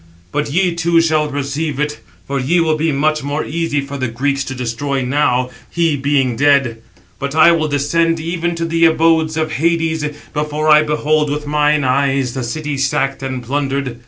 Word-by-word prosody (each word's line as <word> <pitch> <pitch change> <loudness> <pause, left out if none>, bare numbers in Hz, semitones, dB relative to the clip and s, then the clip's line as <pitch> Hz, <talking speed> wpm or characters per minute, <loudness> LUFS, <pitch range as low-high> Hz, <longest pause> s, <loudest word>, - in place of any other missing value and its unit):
But 150 0 -1
ye 180 +2 +1
too 170 0 +2
shall 155 -2 +2
perceive 145 +1 -3
it, 150 0 -2 0.3
for 140 0 -2
ye 155 +8 +1
will 160 -2 +2
be 160 +1 0
much 155 +2 +1
more 145 +2 -3
easy 165 -2 -1
for 140 0 -6
the 130 - -1
Greeks 135 +4 -1
to 130 - -5
destroy 130 +3 -2
now, 125 -1 +1 0.2
he 165 0 +1
being 135 -3 +1
dead; 135 -4 +2 0.4
but 140 +1 -4
I 160 +2 +7
will 160 -2 +1
descend 165 +3 +1
even 170 +1 -2
to 165 0 -2
the 165 0 +2
abode 160 -1 +2
of 155 0 -1
Hades, 165 0 0 0.3
before 150 +1 -1
I 155 0 +7
behold 150 0 0
with 150 +1 -3
mine 150 0 +2
eyes 135 -1 +1
the 130 - -3
city 145 +4 -3
sacked 135 0 0
and 130 -2 -4
plundered." 135 -1 -2
150 Hz, 185 wpm, -17 LUFS, 135-160 Hz, 0.4 s, I